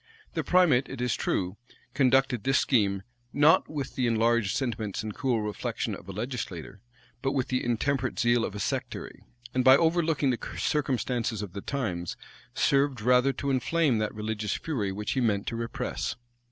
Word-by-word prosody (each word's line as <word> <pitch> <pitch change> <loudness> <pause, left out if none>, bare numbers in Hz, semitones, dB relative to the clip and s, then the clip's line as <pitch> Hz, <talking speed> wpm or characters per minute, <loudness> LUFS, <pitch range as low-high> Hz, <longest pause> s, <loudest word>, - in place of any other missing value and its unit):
The - - -1
primate, 165 -8 +4
it 135 - -7
is 125 -2 0
true, 95 +2 -1 0.4
conducted 130 -3 +3
this 135 0 +3
scheme, 100 -6 +2 0.3
not 150 +3 +4
with 145 -3 -4
the 125 -3 0
enlarged 115 -1 +2
sentiments 110 -7 -2
and 110 -1 -4
cool 125 -4 0
reflection 105 -1 -3
of 95 - -9
a - - -3
legislator, 100 - -5 0.4
but 135 - 0
with 130 -3 -1
the 130 0 0
intemperate 130 +2 0
zeal 120 -1 +3
of 105 - -3
a - - -4
sectary; - - -4 0.3
and 130 - +2
by 130 +1 +8
over 170 +2 +3
looking 155 -4 +1
the 120 - -2 0.2
circumstances 120 -6 -1
of 100 - -7
the 100 - -5
times, 95 -12 -3 0.4
served 140 -2 +2
rather 125 +4 +4
to 140 +1 -2
inflame 135 -1 +2
that 105 -1 -1
religious 105 -1 -2
fury 115 -12 -2
which 105 +2 -3
he 130 - 0
meant 105 -4 +1
to 115 - -3
repress. 115 0 -3
120 Hz, 175 wpm, -28 LUFS, 105-135 Hz, 0.4 s, by